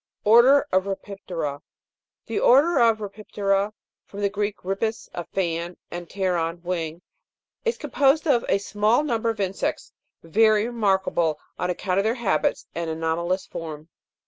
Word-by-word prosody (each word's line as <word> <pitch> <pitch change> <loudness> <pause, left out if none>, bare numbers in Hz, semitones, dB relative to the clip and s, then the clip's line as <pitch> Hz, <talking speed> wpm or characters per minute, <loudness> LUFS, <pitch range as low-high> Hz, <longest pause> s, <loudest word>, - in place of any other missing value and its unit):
ORDER 240 +6 +6
OF 185 +1 +2
RHIPIP'TERA. 185 -7 -4
12. - - -43 0.6
The 225 - -2
order 285 +5 +5
of 230 -2 +5
Rhipip'tera 200 -1 -1 0.4
(from 205 - -8
the 200 - +2
Greek, 205 +1 -2
ripis, 205 +4 -2
a 175 - -5
fan, 170 -1 -2
and 175 -1 -6
pteron, 175 -3 -1
wing) 170 -2 -3 0.6
is 465 - 0
composed 285 +3 +2
of 240 -5 +3
a 195 - +4
small 210 +6 +1
number 230 -5 0
of 225 -1 -3
insects, 195 -1 -2 0.3
very 215 +5 +3
remarkable 190 -8 +1 0.2
on 180 - -1
account 180 +1 0
of - - +2
their 225 +2 +1
habits 200 -11 0
and 170 -1 -3
anomalous 165 +3 -1
form. 155 -1 -7
195 Hz, 145 wpm, -24 LUFS, 175-220 Hz, 0.6 s, ORDER